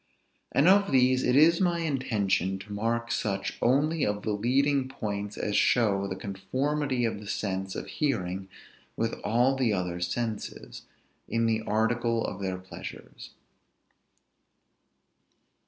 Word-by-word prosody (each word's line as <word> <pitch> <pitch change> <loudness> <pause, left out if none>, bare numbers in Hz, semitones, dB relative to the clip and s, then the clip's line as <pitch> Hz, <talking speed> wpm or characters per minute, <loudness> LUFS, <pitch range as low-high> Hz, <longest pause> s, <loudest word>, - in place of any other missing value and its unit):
And 140 +4 +3
of 200 +1 +5
these 130 0 +4
it 125 - +2
is 165 +4 +6
my 175 -2 +2
intention 105 - 0
to 95 +2 -9
mark 115 +3 -1
such 100 -6 -2
only 145 +5 +2
of 105 0 -1
the 110 - -1
leading 130 +5 +1
points 105 -4 -4
as 105 - -2
show 100 -5 +3
the 95 - -4
conformity 130 +7 -1
of 110 -3 -2
the 105 - -10
sense 95 -2 -3
of - - -4
hearing 95 - -2 0.5
with 115 0 0
all 125 +5 +3
the 125 -5 +1
other 90 -2 -2
senses, 105 +5 -4 0.4
in 115 0 0
the 110 -1 +1
article 115 +1 +1
of 100 - -5
their 95 -1 -2
pleasures. 95 0 -10
115 Hz, 135 wpm, -28 LUFS, 100-130 Hz, 0.5 s, is